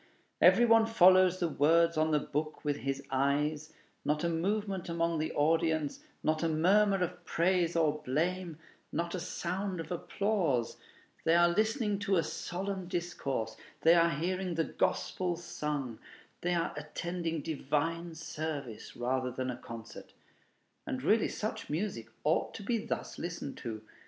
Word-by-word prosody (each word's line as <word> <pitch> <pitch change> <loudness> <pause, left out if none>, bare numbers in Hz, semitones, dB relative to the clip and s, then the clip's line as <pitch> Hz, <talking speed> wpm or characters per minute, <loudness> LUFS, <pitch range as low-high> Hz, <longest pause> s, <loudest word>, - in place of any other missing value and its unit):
Every 240 - +7
one 225 -1 +5
follows 185 -3 +6
the 175 - +1
words 165 +2 +3
on 155 0 +2
the 155 - +3
book 150 +2 -4
with 145 -1 +1
his 135 0 -3
eyes; 145 +3 0 0.3
not 150 +2 0
a 170 - +2
movement 190 +2 -1
among 170 -1 0
the 155 - -1
audience, 160 0 +1 0.2
not 155 0 +1
a 165 - +1
murmur 195 +5 +4
of 175 0 -5
praise 175 0 +1
or 155 -2 +2
blame, 170 +4 -1 0.3
not 170 0 -2
a 185 - -2
sound 180 +2 -3
of 165 - -6
applause; 175 - 0 0.5
they 165 - +4
are 175 0 +6
listening 215 +2 +1
to 200 -1 +1
a 165 - +3
solemn 190 +1 -4
discourse, 170 - -3 0.3
they 165 - +7
are 170 -1 +5
hearing 180 +3 -2
the 165 - +2
gospel 180 +2 -1
sung, 150 -7 -4 0.4
they 175 0 +1
are 170 -1 0
attending 165 +2 -3
divine 165 +2 -1
service 155 -6 -5
rather 130 +1 0
than 130 +1 -3
a 120 - -6
concert. 115 -2 -10 0.7
And 130 0 -3
really 215 +8 +4
such 215 - -4
music 155 - -2 0.2
ought 155 +2 +1
to - - -7
be 230 +1 0
thus - - -4
listened 170 -4 -5
to. 110 -3 -6
165 Hz, 150 wpm, -32 LUFS, 150-185 Hz, 0.7 s, Every